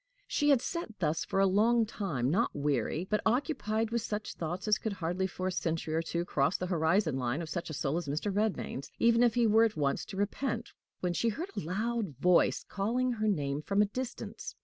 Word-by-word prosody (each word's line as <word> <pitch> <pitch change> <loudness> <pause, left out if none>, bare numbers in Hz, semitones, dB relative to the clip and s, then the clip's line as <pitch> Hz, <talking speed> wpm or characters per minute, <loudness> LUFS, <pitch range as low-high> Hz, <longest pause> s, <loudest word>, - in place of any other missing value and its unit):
She 295 -9 +1
had 270 -4 +4
sat 335 - -4
thus 160 -1 0
for 195 - -1
a 195 - +5
long 220 +4 +4
time, 160 - -2
not 220 +8 +1
weary, 145 +3 0
but 210 +1 +1
occupied 225 -3 0
with 235 0 0
such 210 -1 -4
thoughts 175 +5 -4
as 210 - +4
could 220 - -2
hardly 185 +1 -1
for 185 0 -5
a 185 - +1
century 165 -3 -2
or 160 - +2
two 170 +1 -2
cross 145 +1 +1
the 180 - -3
horizon 170 -2 +2
line 125 +3 -1
of 165 -2 -5
such 170 +3 -3
a - - -5
soul 140 +2 -1
as 175 -3 -3
Mr. 155 +8 -1
Redmain's, 205 -9 -1
even 235 0 +4
if 240 -1 +4
he 240 -1 +4
were 220 +1 +5
at 220 -6 +1
once 140 -2 0
to 195 - -8
repent, 230 +3 -2 0.3
when 180 -1 0
she 230 +6 +1
heard 335 - -4
a - - -1
loud 210 - -2
voice 180 +4 +3
calling 245 +6 0
her 215 -2 -1
name 145 -7 0
from 200 +5 0
a 210 - +6
distance. 255 -1 -5
195 Hz, 220 wpm, -31 LUFS, 160-225 Hz, 0.3 s, a